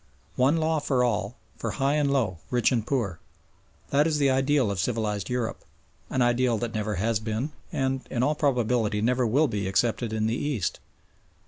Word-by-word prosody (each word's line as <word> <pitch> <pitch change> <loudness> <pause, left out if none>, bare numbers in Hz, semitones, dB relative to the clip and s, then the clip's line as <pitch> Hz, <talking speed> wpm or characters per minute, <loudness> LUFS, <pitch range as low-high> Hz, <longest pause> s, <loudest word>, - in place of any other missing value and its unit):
One 135 +6 +3
law 160 0 +1
for 130 -3 +1
all, 110 -2 -1 0.2
for - - -3
high 140 0 +2
and 145 -2 +2
low, 110 -11 0
rich 125 0 +2
and 115 -3 0
poor. 105 -11 -1 0.7
That 145 +3 +4
is 155 -2 +1
the 140 -2 +3
ideal 135 -3 +2
of 100 - -3
civilised 105 -2 -1
Europe 125 -2 -2 0.5
an 130 - +1
ideal 120 -1 +2
that 115 +1 -3
never 105 -1 -2
has 110 +3 0
been 110 +6 -3 0.2
and 135 0 -1
in 120 -1 0
all 145 +3 +3
probability 120 -7 +1
never 125 +2 +2
will 140 +8 +3
be 105 -5 -2
accepted 115 +3 0
in 110 0 0
the 110 - +1
East. 130 -9 -2
120 Hz, 185 wpm, -26 LUFS, 110-135 Hz, 0.7 s, That